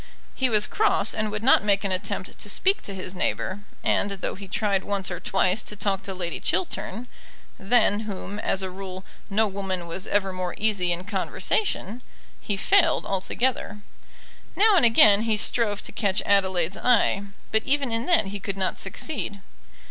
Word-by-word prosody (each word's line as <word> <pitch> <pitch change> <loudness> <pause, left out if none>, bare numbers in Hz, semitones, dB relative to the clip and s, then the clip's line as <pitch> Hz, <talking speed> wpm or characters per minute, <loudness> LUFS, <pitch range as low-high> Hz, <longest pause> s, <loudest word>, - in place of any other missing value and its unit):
He 260 -1 +1
was 215 -2 +3
cross, 430 +1 +1
and 215 -1 -2
would 210 +1 -5
not 260 -4 +5
make 200 -1 +2
an 195 - -1
attempt 185 0 -3
to 205 - -4
speak 385 - +1
to 200 - -7
his 185 0 -5
neighbour, 185 +1 -2 0.2
and, 200 - +1
though 200 -1 -4
he 195 0 -9
tried 200 -1 0
once 195 -2 -2
or 175 - -4
twice 190 +1 +1
to 210 - -5
talk 195 -1 -1
to 195 - -6
Lady 175 -3 -4
Chiltern 190 +5 -2 0.5
than 205 0 +3
whom, 205 -1 -6
as 190 -3 0
a 190 - -4
rule, 190 0 -8 0.2
no 215 +2 +2
woman 190 -3 -4
was 170 +3 -2
ever 195 -2 0
more 185 -1 -4
easy 200 -4 +1
in 175 +1 -2
conversation 205 - 0 0.4
he 205 - -3
failed 335 - +3
altogether. 210 +2 -2 0.7
Now 420 0 +5
and 335 - +5
again 215 -3 +7
he 225 -1 +1
strove 210 -1 +1
to - - -5
catch 200 -2 0
Adelaide's 190 -3 +1
eye, 230 -4 +2 0.3
but 220 - +3
even 275 -2 0
in 230 +1 -2
that 345 - +3
he 200 +1 -5
could 195 0 -4
not 190 -1 -1
succeed. 250 -9 -4
200 Hz, 180 wpm, -24 LUFS, 190-220 Hz, 0.7 s, again